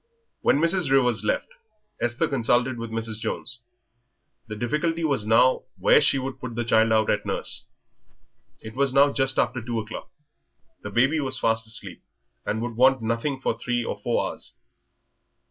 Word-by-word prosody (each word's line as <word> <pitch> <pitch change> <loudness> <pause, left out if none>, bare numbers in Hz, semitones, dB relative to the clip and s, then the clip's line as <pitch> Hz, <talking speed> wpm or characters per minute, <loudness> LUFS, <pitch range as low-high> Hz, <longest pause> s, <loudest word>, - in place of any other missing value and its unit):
When - - +3
Mrs. 170 0 +2
Rivers 125 -5 +3
left, 105 - 0 0.5
Esther 120 +1 0
consulted 125 -1 +1
with 115 0 -5
Mrs. 110 -1 -4
Jones. 120 +2 -4 0.9
The 105 - -6
difficulty 155 +9 -1
was 135 -9 0
now 115 +4 +4
where - - +5
she - - +3
should 135 0 -5
put 120 -2 -6
the 120 - -1
child 110 0 +3
out 110 -1 +3
at - - 0
nurse. - - -3 1.0
It 110 - -9
was 135 +1 +1
now 140 +1 +5
just 135 -1 +2
after 125 0 +1
two 120 0 -3
o'clock. 110 0 -7 0.7
The 100 - -6
baby 135 +9 +2
was 130 -2 -1
fast 115 -2 0
asleep, 110 - -3 0.5
and 110 +2 -1
would 120 -2 -4
want 130 -1 +4
nothing 115 +5 -1
for 130 - -1
three 120 0 -2
or - - -4
four - - 0
hours. - - -5
120 Hz, 165 wpm, -25 LUFS, 115-135 Hz, 1.0 s, where